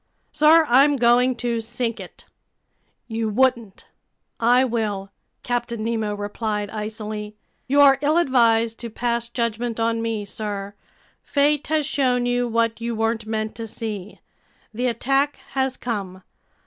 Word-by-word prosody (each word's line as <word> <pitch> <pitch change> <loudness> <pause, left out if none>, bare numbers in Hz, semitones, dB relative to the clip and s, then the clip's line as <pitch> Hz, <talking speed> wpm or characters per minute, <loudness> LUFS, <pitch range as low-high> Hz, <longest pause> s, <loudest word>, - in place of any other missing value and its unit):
"Sir, 315 +2 +5
I'm 280 +4 +5
going 245 0 +3
to 235 -1 -2
sink 235 0 -3
it." 185 - -11 0.8
"You 225 -1 -2
wouldn't!" 235 -3 0 0.5
"I 245 +3 +4
will," 210 -5 -2 0.3
Captain 240 -2 -2
Nemo 220 -2 -1
replied 205 0 -3
icily. 215 -1 -5 0.3
"You're 275 0 +6
ill 300 +3 +2
advised 230 -7 +3
to 235 - -6
pass 235 +1 -2
judgment 235 -1 -2
on 230 0 0
me, 225 -2 -2
sir. 200 -1 -5 0.5
Fate 290 0 +1
has 310 -1 +1
shown 255 -4 +1
you 245 0 +1
what 230 0 0
you 235 0 -2
weren't 225 0 -1
meant 215 0 -2
to 225 -1 -5
see. 210 -3 -6 0.5
The 245 +3 -1
attack 270 +5 +1 0.2
has 265 -1 -1
come. 195 -6 -5
230 Hz, 135 wpm, -22 LUFS, 215-250 Hz, 0.8 s, You're